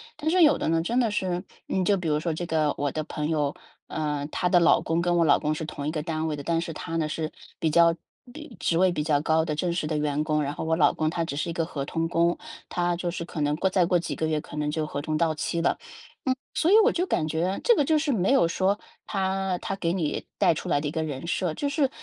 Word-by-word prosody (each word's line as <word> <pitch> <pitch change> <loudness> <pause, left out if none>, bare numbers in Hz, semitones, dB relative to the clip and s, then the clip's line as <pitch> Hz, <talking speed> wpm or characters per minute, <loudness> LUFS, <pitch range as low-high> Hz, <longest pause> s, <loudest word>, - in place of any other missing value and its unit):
但 310 +1 -1
是 365 +1 +4
有 305 -3 +6
的 - - -1
呢 165 0 +2
真 230 +9 -1
的 230 -3 +1
是， 185 -3 -1 0.2
嗯， 190 - 0
就 200 +2 +3
比 180 -3 -4
如 150 -1 +2
说 160 +2 -1
这 175 +3 -4
个， 155 -3 +1
我 145 0 0
的 155 - -2
朋 150 -1 -3
友， 150 -3 0 0.3
呃， 150 -2 -2
她 180 - 0
的 175 -1 +4
老 170 - +5
公 165 +1 0
跟 175 0 +1
我 170 - +4
老 155 - +5
公 150 0 -1
是 155 +1 -4
同 145 -2 -6
一 150 - 0
个 155 -1 -2
单 160 0 -2
位 150 -2 -2
的， 145 - -6
但 165 +2 0
是 170 - -4
他 165 +1 -5
呢 160 -2 0
是， 155 0 -2 0.3
比 160 - +1
较 170 +1 +5 0.4
比 305 -4 -10
职 165 - 0
位 185 +2 +5
比 155 -4 -1
较 150 -2 +2
高 160 +1 +2
的 155 - -2
正 170 +3 -1
式 170 -2 -1
的 155 0 -1
员 150 0 0
工， 155 -1 +1
然 140 0 -2
后 - - -5
我 160 0 +1
老 - - +4
公 155 0 0
他 165 0 -1
只 140 - -4
是 150 +4 -2
一 - - -3
个 165 -1 -1
合 145 -4 -4
同 165 +3 -2
工， 170 +1 +2 0.3
他 175 0 0
就 175 0 -2
是 170 0 -5
可 165 -2 -5
能 145 0 +1
过 190 - +1
再 185 -2 +3
过 175 0 +2
几 170 - -4
个 160 - -1
月 155 -1 0
可 150 - -10
能 150 0 -1
就 155 0 -2
合 145 - -4
同 155 +1 -1
到 160 -1 +1
期 170 +2 -2
了。 165 - +1
嗯， - - -20 0.7
所 330 - +2
以 - - +7
我 470 - +5
就 360 +2 0
感 155 - 0
觉， 170 +5 -1
这 475 - +5
个 290 - +3
就 315 +3 +3
是 300 -1 +1
没 200 +1 +2
有 270 -10 +5
说， 190 +4 +1 0.3
她 190 -1 -1
她 195 - -4
给 170 -3 -1
你 170 -5 -2
带 - - +4
出 160 - -5
来 145 - +2
的 145 - -2
一 - - -2
个 160 +1 -2
人 145 -2 -5
设， 180 -2 -1
就 285 - -2
是， 280 -1 +1
165 Hz, 310 characters per minute, -26 LUFS, 155-180 Hz, 0.7 s, 以